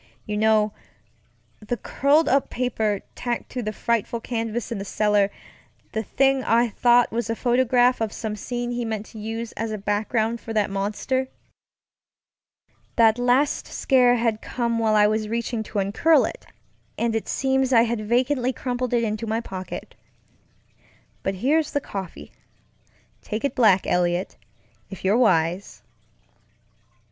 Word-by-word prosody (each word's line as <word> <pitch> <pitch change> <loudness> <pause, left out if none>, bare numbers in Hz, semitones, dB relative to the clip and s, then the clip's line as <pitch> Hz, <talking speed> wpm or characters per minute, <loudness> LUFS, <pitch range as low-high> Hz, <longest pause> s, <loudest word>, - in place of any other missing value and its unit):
You 210 - -3
know, 215 0 +3 0.9
the 225 +3 -3
curled 285 +8 +2
up 275 +1 +2
paper 220 -5 -1
tacked 240 -1 -4
to 250 - -3
that 215 -2 -4
frightful 235 0 -1
canvas 230 0 -3
in 225 - -3
the - - -4
cellar; 205 0 +2 0.6
the 220 - -1
thing 270 +4 +1
I 235 +1 +3
thought 240 +2 +3
was 235 0 -2
a 225 - 0
photograph 245 0 +2
of 220 -2 -1
some 220 -2 -4
scene 240 +3 -4
he 240 0 -2
meant 220 -2 -3
to 220 - -9
use 225 +2 -5
as 225 0 -4
a 215 - -3
background 220 +3 -1
for 225 - -6
that 210 -2 +1
monster. 210 +7 -1 1.7
That 225 0 +4
last 250 +4 +2
scare 250 -3 +3
had 230 -2 0
come 235 -2 -2
while 220 -1 +2
I 210 -1 +6
was 215 0 0
reaching 235 0 -2
to 210 - -6
uncurl 205 +12 +3
it, - - -7 0.5
and 230 -1 0
it 225 - -2
seems 265 -1 +1
I 230 -2 +6
had 235 -1 -1
vacantly 250 +3 +1
crumpled 250 0 -2
it 235 - +2
into 215 0 -2
my 220 +1 0
pocket. 190 -5 -7 1.3
But 195 - -2
here's 295 +9 +1
the 285 - +2
coffeeŌĆötake 185 - -7 1.1
it 280 - 0
black, 205 -6 +4
Eliot, 175 +1 0 0.5
if 195 -1 -9
you're 195 +3 +4
wise. 180 -6 +1
230 Hz, 150 wpm, -24 LUFS, 210-245 Hz, 1.7 s, I